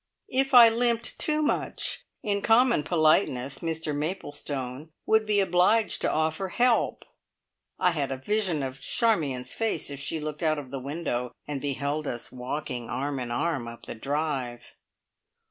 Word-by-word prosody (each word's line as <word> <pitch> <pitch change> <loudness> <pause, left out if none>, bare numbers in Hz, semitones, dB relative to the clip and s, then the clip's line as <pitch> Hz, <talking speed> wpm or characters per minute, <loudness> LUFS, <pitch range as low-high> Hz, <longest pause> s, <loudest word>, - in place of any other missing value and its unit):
If 270 +1 +2
I 235 -1 +11
limped 235 0 +1
too 305 0 +3
much, 300 - -1 0.2
in 200 -2 0
common 235 -3 +4
politeness 155 -5 +2
Mr 160 -2 -2
Maplestone 145 -4 -4 0.2
would 220 0 +3
be 210 -1 +3
obliged 195 +4 +3
to - - +1
offer 160 +4 0
help. 240 +5 +2 0.7
I 180 - +3
had 145 -5 -2
a 135 - -2
vision 180 0 0
of 130 0 -5
Charmion's 145 - 0
face 225 -9 -1
if 140 - -6
she 150 +3 -3
looked 150 +1 -5
out 155 -2 +2
of 135 -3 -7
the 135 - -4
window 130 -3 -3
and 145 -2 -4
beheld 145 +1 -2
us 120 -1 -4
walking 125 -1 -4
arm 140 0 -2
in 125 -1 -4
arm 125 +1 -1
up 115 0 -10
the - - -6
drive! 135 -1 -3
155 Hz, 155 wpm, -27 LUFS, 135-205 Hz, 0.7 s, I